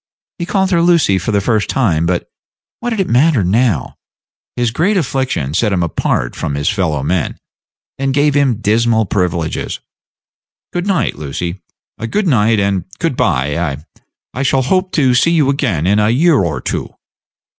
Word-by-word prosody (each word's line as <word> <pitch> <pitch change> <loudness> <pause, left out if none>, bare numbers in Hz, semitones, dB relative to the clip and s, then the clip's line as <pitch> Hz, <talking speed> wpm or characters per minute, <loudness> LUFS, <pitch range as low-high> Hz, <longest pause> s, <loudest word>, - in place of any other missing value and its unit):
He 170 - -3
called 190 0 +1
her 170 -2 +3
Lucy 170 - +3
for 100 - -2
the 100 - +2
first 110 0 0
time; 85 -11 +1
but 90 0 -1 0.5
what 240 - -3
did 225 -3 -2
it 190 - +1
matter 130 - +3
now? 100 - 0 0.6
His 120 -1 0
great 180 - +1
affliction 130 - -1
set 105 +5 +1
him 90 -3 +1
apart 65 -6 -1
from 70 - -3
his 75 +1 0
fellowmen, 85 -4 -1 0.6
and 135 0 0
gave 145 +2 +2
him 135 -6 +1
dismal 110 +1 +2
privileges. 85 -4 -2 0.9
"Good 175 +2 -2
night, 180 - 0
Lucy; 85 +5 -5 0.5
good 210 - 0
night 110 -6 +3
and 100 -3 0
good - - -1
by. 70 +3 0
I 80 -3 -3 0.5
I 130 - -3
shall 135 -1 +2
hope 185 +7 0
to 135 -5 +3
see 165 +7 +3
you 150 -5 +3
again 115 - -1
in 100 +3 +3
a 105 0 +2
year 150 +5 +3
or 80 -4 -2
two." - - -4
115 Hz, 165 wpm, -16 LUFS, 90-145 Hz, 0.9 s, her